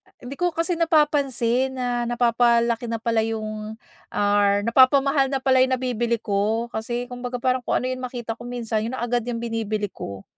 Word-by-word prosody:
hindi 265 Hz, +5 st, -10 dB
ko 355 Hz, -, +2 dB
kasi 335 Hz, +1 st, -1 dB
napapansin 270 Hz, -6 st, +2 dB
na 245 Hz, -2 st, -1 dB
napapalaki 235 Hz, -1 st, +2 dB
na 230 Hz, 0 st, -2 dB
pala 225 Hz, 0 st, 0 dB
'yong, 215 Hz, -1 st, -4 dB, 0.4 s
or 205 Hz, 0 st, +2 dB
napapamahal 270 Hz, +3 st, +4 dB
na 270 Hz, -1 st, -3 dB
pala 260 Hz, -1 st, +4 dB
'yong 260 Hz, 0 st, +3 dB
nabibili 240 Hz, -2 st, -1 dB
ko 215 Hz, +3 st, -1 dB
kasi, 240 Hz, +2 st, -3 dB
kumbaga 245 Hz, 0 st, -5 dB
parang 255 Hz, +1 st, +1 dB
kung 245 Hz, -, -1 dB
ano -, -, -2 dB
'yong 255 Hz, -, -4 dB
makita 245 Hz, -2 st, -5 dB
ko 240 Hz, +1 st, -11 dB
minsan, 235 Hz, -3 st, -2 dB
'yon 255 Hz, -, -4 dB
na 240 Hz, -, -4 dB
agad 240 Hz, 0 st, 0 dB
'yong 235 Hz, -1 st, -3 dB
binibili 215 Hz, -3 st, -2 dB
ko. 100 Hz, -1 st, -8 dB
240 Hz, 180 wpm, -23 LUFS, 225-255 Hz, 0.4 s, napapamahal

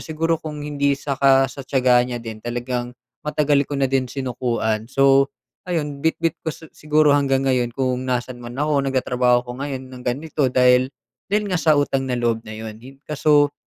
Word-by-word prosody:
siguro 165 Hz, +1 st, -1 dB
kung 150 Hz, -2 st, -6 dB
hindi 140 Hz, -1 st, 0 dB
saka 135 Hz, -1 st, +3 dB
sa 135 Hz, -, -9 dB
tiyaga 130 Hz, -2 st, +3 dB
niya 120 Hz, -1 st, -3 dB
din, 110 Hz, -1 st, -7 dB
talagang 120 Hz, +1 st, -4 dB, 0.2 s
matagal 150 Hz, -2 st, +1 dB
ko 145 Hz, -, -3 dB
na 135 Hz, -, +1 dB
din 130 Hz, -1 st, 0 dB
sinukuan. 120 Hz, -4 st, -2 dB
So, 135 Hz, +1 st, +4 dB, 0.4 s
ayun 150 Hz, -5 st, -2 dB
bitbit 165 Hz, +1 st, 0 dB
ko -, -, -4 dB
si 160 Hz, 0 st, -8 dB
siguro 150 Hz, -1 st, +3 dB
hanggang 135 Hz, -2 st, +2 dB
ngayon 125 Hz, -3 st, +1 dB
kung 130 Hz, -2 st, 0 dB
nasaan 125 Hz, 0 st, -2 dB
man 120 Hz, +1 st, -8 dB
ako. 145 Hz, 0 st, +1 dB
Nagtatrabaho 125 Hz, -2 st, +2 dB
ako 125 Hz, -, -8 dB
ngayon 130 Hz, -2 st, -5 dB
ng 125 Hz, -, -9 dB
ganito 140 Hz, +2 st, -1 dB
dahil 125 Hz, 0 st, +4 dB, 0.4 s
dahil 210 Hz, +1 st, +1 dB
nga 180 Hz, -, +1 dB
sa 155 Hz, -2 st, +4 dB
utang 135 Hz, -2 st, 0 dB
na 125 Hz, -, 0 dB
loob 115 Hz, -2 st, 0 dB
na 110 Hz, -, -7 dB
yon. 110 Hz, 0 st, -8 dB
Hin 135 Hz, +2 st, -13 dB
kaso 145 Hz, -1 st, +3 dB
135 Hz, 185 wpm, -21 LUFS, 125-145 Hz, 0.4 s, So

